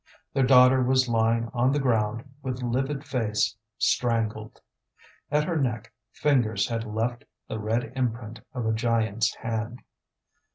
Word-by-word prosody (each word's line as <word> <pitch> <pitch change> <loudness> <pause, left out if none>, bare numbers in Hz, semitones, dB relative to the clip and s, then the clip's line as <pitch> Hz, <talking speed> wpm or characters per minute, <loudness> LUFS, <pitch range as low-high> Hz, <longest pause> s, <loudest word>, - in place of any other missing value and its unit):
Their 135 -2 +2
daughter 130 0 +7
was 130 +1 +3
lying 115 0 +1
on 125 +1 +2
the 145 - +1
ground, 115 -3 +1 0.2
with 130 -1 -4
livid 135 +4 -1
face, 115 -7 0 0.2
strangled. 110 -3 0 0.7
At 150 +1 +2
her 165 +1 -1
neck 120 -5 -2 0.2
fingers 120 -9 +1
had 115 -1 -2
left 115 +3 -2 0.2
the 110 - -4
red 115 +3 -1
imprint 115 -3 -3 0.2
of 125 -2 -2
a 110 - +1
giant's 115 -1 +1
hand. 115 +2 -4
120 Hz, 135 wpm, -26 LUFS, 110-130 Hz, 0.7 s, daughter